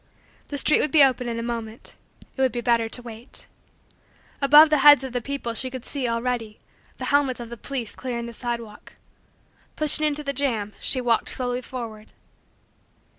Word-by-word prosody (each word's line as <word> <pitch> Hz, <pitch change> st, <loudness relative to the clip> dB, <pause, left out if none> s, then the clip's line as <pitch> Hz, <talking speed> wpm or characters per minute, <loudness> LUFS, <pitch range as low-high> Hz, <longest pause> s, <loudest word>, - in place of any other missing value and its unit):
The 285 Hz, -, -5 dB
street 305 Hz, +2 st, +4 dB
would 300 Hz, -, +1 dB
be 290 Hz, +1 st, +6 dB
open 255 Hz, -2 st, +2 dB
in 230 Hz, -, -3 dB
a 230 Hz, -, -3 dB
moment. 230 Hz, -1 st, -6 dB, 0.4 s
It 265 Hz, -, -3 dB
would 260 Hz, -1 st, +3 dB
be 240 Hz, -, -3 dB
better 235 Hz, -1 st, +1 dB
to 245 Hz, -, -2 dB
wait. 230 Hz, +1 st, -5 dB, 1.0 s
Above 295 Hz, +3 st, +7 dB
the 305 Hz, -, +4 dB
heads 290 Hz, -1 st, +7 dB
of 260 Hz, -2 st, -6 dB
the 245 Hz, -, -1 dB
people 275 Hz, -2 st, -4 dB
she 255 Hz, +3 st, -2 dB
could 255 Hz, -1 st, -8 dB
see, 275 Hz, -4 st, -3 dB
already, 230 Hz, -2 st, -2 dB, 0.4 s
the -, -, -5 dB
helmets 275 Hz, -3 st, +2 dB
of 235 Hz, -1 st, -7 dB
the 235 Hz, -, -7 dB
police 245 Hz, -2 st, -5 dB
clearing 240 Hz, -2 st, -5 dB
the 235 Hz, -, -8 dB
sidewalk. 235 Hz, -3 st, -6 dB, 0.8 s
Pushing 305 Hz, 0 st, +2 dB
into 300 Hz, 0 st, -2 dB
the 280 Hz, -1 st, -2 dB
jam, 230 Hz, -7 st, -1 dB
she 260 Hz, -, +1 dB
worked 235 Hz, -2 st, +1 dB
slowly 250 Hz, -1 st, -2 dB
forward. 230 Hz, -4 st, -8 dB
245 Hz, 180 wpm, -24 LUFS, 230-275 Hz, 1.0 s, Above